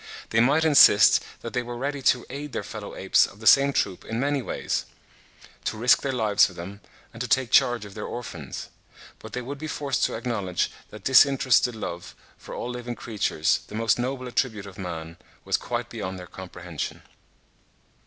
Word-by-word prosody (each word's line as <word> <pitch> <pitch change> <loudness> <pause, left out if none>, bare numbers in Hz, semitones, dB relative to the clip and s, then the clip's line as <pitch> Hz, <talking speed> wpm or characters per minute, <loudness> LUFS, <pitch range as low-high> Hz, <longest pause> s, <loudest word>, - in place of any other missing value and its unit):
They 115 - +3
might 140 +7 +4
insist 140 -9 +7 0.2
that 115 - -7
they 125 - 0
were 120 0 -7
ready 140 +2 -3
to 125 -1 +2
aid 145 +1 -7
their - - -3
fellow - - -8
apes - - +3
of 100 - -16
the 110 - -11
same 140 +5 +7
troop 95 -8 -1
in 115 +1 -4
many 140 +1 0
ways, - - -3 0.8
to - - -2
risk 120 +3 +4
their 140 - -1
lives 110 -5 +3
for 95 - -11
them, 95 +4 -9 0.3
and 115 - -8
to 125 - -2
take 130 -3 +1
charge 120 -3 +4
of 100 - -11
their 105 - -6
orphans; 85 - -7 0.5
but - - -11
they 125 - -3
would 140 +3 -7
be 155 - -5
forced 140 -4 -2
to - - -2
acknowledge 110 -7 -2 0.2
that 105 -2 -12
disinterested 130 -2 +4
love 85 -5 -6 0.2
for - - -9
all 125 - -4
living 120 0 -5
creatures, 100 -9 0
the 105 - -9
most 115 +1 +1
noble 130 +1 -3
attribute 115 -4 -1
of 100 0 -11
man, 85 -3 -6 0.3
was - - +1
quite - - -3
beyond 95 0 -5
their 90 - -8
comprehension. 90 -3 -7
120 Hz, 190 wpm, -25 LUFS, 100-130 Hz, 0.8 s, insist